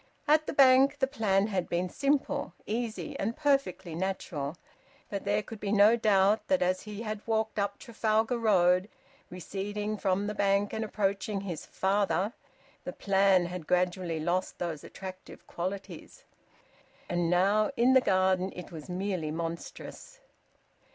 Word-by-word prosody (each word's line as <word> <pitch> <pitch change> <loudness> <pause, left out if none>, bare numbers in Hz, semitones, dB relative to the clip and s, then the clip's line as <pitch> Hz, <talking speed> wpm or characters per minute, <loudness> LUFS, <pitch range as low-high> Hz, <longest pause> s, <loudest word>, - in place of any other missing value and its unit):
At 310 +1 +4
the - - -2
Bank 270 0 +6
the 270 - +2
plan 210 -7 +1
had 195 -5 -2
been 175 +1 0
simple, 275 -4 -1
easy, 215 -6 -3
and 225 +4 -2
perfectly 275 - 0
natural. 165 -4 -3 0.5
But 200 -1 -4
there 205 +1 +1
could 225 0 -9
be 200 -1 -3
no 210 +2 +6
doubt, 210 -2 +3
that 280 -6 +2
as 185 +1 0
he 210 +1 -7
had 215 -2 -4
walked 220 -1 0
up 200 0 -1
Trafalgar 225 0 0
Road, 185 -3 +3 0.4
receding 205 +4 -4
from 195 0 0
the 210 - -2
Bank 200 0 +1
and 220 - -2
approaching 200 -1 -1
his 180 -5 -6
father, 195 +1 0 0.5
the - - -5
plan 195 -2 +3
had 175 -2 -6
gradually 180 -2 0
lost 175 +4 -1
those 165 -4 -4
attractive 185 -1 -10
qualities. 190 +3 -6 0.8
And 175 -1 0
now 195 +4 +3
in 245 +3 +4
the 260 - +6
garden 185 -2 +2
it 180 +1 -9
was 160 -1 -9
merely 180 -3 -2
monstrous. 170 - -6
200 Hz, 145 wpm, -29 LUFS, 180-220 Hz, 0.8 s, Bank